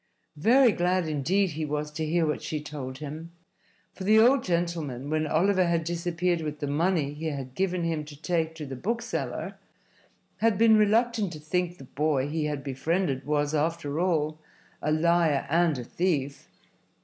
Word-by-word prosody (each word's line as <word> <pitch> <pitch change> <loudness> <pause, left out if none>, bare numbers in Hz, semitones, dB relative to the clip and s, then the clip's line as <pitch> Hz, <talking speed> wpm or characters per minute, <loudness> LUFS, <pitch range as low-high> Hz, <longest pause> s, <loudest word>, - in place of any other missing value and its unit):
Very 240 - +5
glad, 180 -2 +1
indeed, 170 +6 +1
he 155 +1 -4
was 150 0 -3
to 155 +1 -4
hear 165 +2 +1
what 150 - -1
she 155 - -3
told 140 -3 -7
him. 155 +3 -7 0.6
For 190 - -8
the 215 +3 +5
old 245 +3 +5
gentleman, 165 -6 -2
when 155 0 0
Oliver 185 +3 +2
had 170 -1 +1
disappeared 170 +1 -1
with 150 -1 -4
the 145 - -3
money 150 0 0
he 155 +2 -5
had 135 -4 -5
given 180 +1 -1
him 165 -2 -1
to 145 -1 -12
take 160 -1 -1
to 155 -2 -6
the 135 -1 -6
bookseller, 230 - -3 0.8
had 225 -3 +2
been 225 0 +6
reluctant 215 -1 +2
to 155 - -8
think 175 +3 -2
the - - -11
boy 140 0 0
he 155 +1 -2
had 145 -2 -3
befriended 140 0 -1
was, 145 0 0
after 155 -1 -1
all, 155 -4 0 0.4
a 150 - 0
liar 160 -2 +2
and 165 -2 +3
a 125 - -5
thief. 145 -1 -2
160 Hz, 175 wpm, -27 LUFS, 150-180 Hz, 0.8 s, been